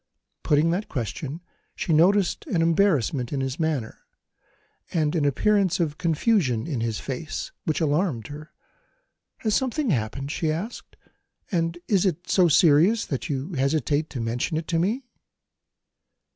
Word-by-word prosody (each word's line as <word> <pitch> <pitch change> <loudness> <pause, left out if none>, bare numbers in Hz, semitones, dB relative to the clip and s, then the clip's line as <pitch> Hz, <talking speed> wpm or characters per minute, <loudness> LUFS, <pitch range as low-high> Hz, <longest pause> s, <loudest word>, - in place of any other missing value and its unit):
Putting 150 +3 +3
that 190 +5 -2
question, 140 - -4 0.3
she 165 - -1
noticed 190 - +3
an 175 - +1
embarrassment 155 - +2
in 140 - -1
his 135 +2 -3
manner, 155 -8 -2 0.9
and 155 -2 +1
an 155 -3 +1
appearance 195 - +2
of 150 -3 -1
confusion 165 - +1
in 140 -8 -3
his 115 -2 -2
face, 140 +4 -5
which 155 - 0
alarmed 150 - 0
her. 150 +4 -9 0.9
"Has 215 -2 0
something 265 0 0
happened?" 135 +2 -2
she 155 0 -1
asked; 185 +10 -6 0.5
"and 165 -2 0
is 195 -4 +3
it 175 -1 -3
so 185 -2 +4
serious 170 +7 +4
that 140 +4 -4
you 145 +5 -3
hesitate 145 +1 0
to 130 - -6
mention 120 +7 -1
it 160 - -4
to 165 -2 +1
me?" 225 +10 0
160 Hz, 145 wpm, -25 LUFS, 140-180 Hz, 0.9 s, so